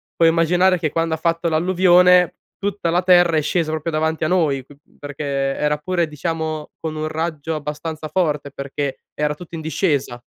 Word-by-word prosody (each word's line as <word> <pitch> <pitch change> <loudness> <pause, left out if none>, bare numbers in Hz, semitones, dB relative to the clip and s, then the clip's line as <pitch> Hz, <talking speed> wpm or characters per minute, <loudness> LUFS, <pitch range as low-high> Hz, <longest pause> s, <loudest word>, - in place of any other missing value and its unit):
puoi 165 -1 +5
immaginare 175 +3 +3
che 160 -2 0
quando 165 +1 0
ha - - -8
fatto 165 +1 0
l'alluvione 180 +1 +4 0.2
tutta 200 -3 -2
la 175 +1 +2
terra 175 -2 +5
è - - +3
scesa 160 +1 0
proprio 160 +1 -3
davanti 160 +1 -1
a - - +2
noi, 155 -7 +1
q 145 - -16 0.3
perché 145 0 -7
era 140 +1 0
pure 170 +2 -1
diciamo 155 0 -4
con 160 -1 -4
un 155 0 -2
raggio 160 0 -3
abbastanza 155 +1 -5
forte, 150 -3 -1
perché 140 0 -4 0.2
era 150 0 -1
tutto 175 +2 -13
in 160 - -5
discesa. 145 -6 -1
160 Hz, 180 wpm, -20 LUFS, 150-175 Hz, 0.3 s, puoi